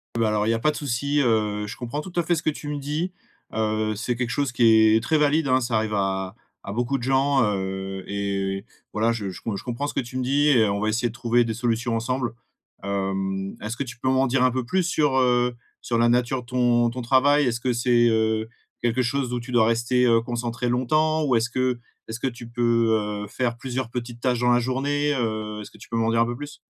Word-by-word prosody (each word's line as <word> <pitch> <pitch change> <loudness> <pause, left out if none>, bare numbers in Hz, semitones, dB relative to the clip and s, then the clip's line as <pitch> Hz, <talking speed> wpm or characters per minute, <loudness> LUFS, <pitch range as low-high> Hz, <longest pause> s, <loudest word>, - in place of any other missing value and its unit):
Ben, 115 - +2
alors, 105 0 +1
il - - +2
y - - +3
a 115 - -1
pas 150 +6 +2
de - - -10
souci, 140 +2 -1
heu, 105 -3 +1
je - - -6
comprends 125 +5 -4
tout 185 - -9
à - - +2
fait 175 - +1
ce 155 - -2
que - - +2
tu 150 0 -6
me 145 - -3
dis, 150 +6 -2 0.4
heu, 110 0 0
c'est 120 +3 -2
quelque 120 -1 -2
chose 140 -2 0
qui 110 -2 +5
est 115 - +2
très 155 +5 +2
valide, 150 +1 +2
hein. 130 0 +3
Ça 120 -1 -1
arrive 110 -1 -1
à 95 0 -1 0.3
à 100 - -6
beaucoup 120 +4 0
de 120 - -8
gens, 135 0 +3
heu 95 -1 -3
et 100 0 -2 0.3
voilà, 110 +2 +2
je 105 -4 -4
je 90 - -9
com 110 -3 -3
je - - -6
comprends 125 +4 -3
ce - - -5
que - - -1
tu 125 +2 -7
me 130 - -1
dis 145 +3 +2
et 115 -6 +5
on 100 0 -1
va 110 - +1
essayer 120 +3 +1
de - - -10
trouver 120 0 +2
des 110 - -2
solutions 120 0 -1
ensemble. 125 +1 -2 0.5
Hem, 95 -1 -2
est-ce 110 +3 -4
que - - -1
tu 120 -3 -9
peux 130 - 0
m'en 130 0 +3
dire 130 +1 +2
un 130 - +4
peu 130 -1 -2
plus 185 +8 +1
sur, 150 -5 +1
heu, 125 -1 +2 0.3
sur 120 - -1
la 120 0 +4
nature 125 +1 +1
de 120 - -17
ton 120 -1 +2
ton 125 +2 -5
travail? 140 +4 +4
Est-ce 120 -1 0
que 125 -1 +1
c'est, 120 0 +3
heu, 110 0 +1 0.3
quelque 120 +2 +1
chose 125 0 -1
où 120 - -1
tu 125 +2 -9
dois 115 -2 +5
rester, 120 +2 +2
heu, 115 -1 +5
concentré 120 0 -3
longtemps 155 +6 +1
ou 130 -4 +2
est-ce 115 +2 0
que 125 0 0 0.3
est-ce 110 +1 -5
que 135 - -1
tu 120 -1 -7
peux, 120 -1 +2 0.4
heu, - - -7
faire 120 +2 -2
plusieurs 130 -1 -4
petites 120 0 -6
tâches 125 -1 0
dans 125 0 +3
la 120 - +4
journée? 145 +4 0
Heu, 110 -4 -3
est-ce 105 - -10
que 110 - -16
tu 105 - -13
peux 115 - -3
m'en 115 0 +1
dire 115 - +2
un - - +4
peu 120 +1 -3
plus? 145 +2 -9
120 Hz, 255 wpm, -24 LUFS, 110-130 Hz, 0.5 s, qui